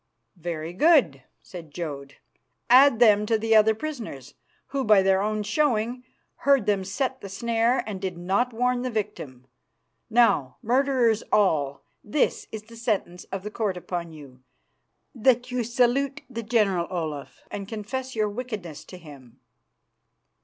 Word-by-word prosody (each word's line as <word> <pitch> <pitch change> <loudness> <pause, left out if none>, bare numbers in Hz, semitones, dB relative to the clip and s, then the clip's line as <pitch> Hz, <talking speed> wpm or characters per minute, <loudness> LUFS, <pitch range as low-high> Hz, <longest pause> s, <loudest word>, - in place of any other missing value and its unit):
"Very 165 0 -5
good," 235 - +4 0.2
said 170 -4 -10
Jodd. 145 -3 -6 0.6
"Add 260 -1 +7
them 210 -3 +5
to 225 - +2
the 225 +1 +2
other 220 0 +5
prisoners, 220 - -7 0.4
who 275 -1 -1
by 210 -4 +5
their 190 0 +3
own 215 +1 -1
showing 240 0 0 0.3
heard 275 -6 +3
them 200 -2 +1
set 260 +7 -3
the 200 - -8
snare 230 +4 +1
and 200 -3 -6
did 185 -3 -4
not 195 +8 0
warn 250 +1 0
the 255 - -2
victim. 145 - -5 0.6
Now, 225 - +3
murderers 245 -2 +2
all, 145 -9 +2 0.2
this 260 +7 0
is 220 -1 -6
the 230 +1 -15
sentence 205 -6 -2
of 195 -1 -6
the 210 - -6
court 210 -4 -2
upon 175 -1 -5
you: 140 -5 -13 0.7
That 245 +1 +2
you 250 -1 -1
salute 255 +4 +1
the 230 -3 -5
General 210 -6 +1
Olaf 155 -6 -5
and 200 -1 -5
confess 245 +5 -5
your 215 -1 +1
wickedness 205 - -6
to 185 - -11
him." 140 -8 -14
215 Hz, 145 wpm, -25 LUFS, 175-245 Hz, 0.7 s, Add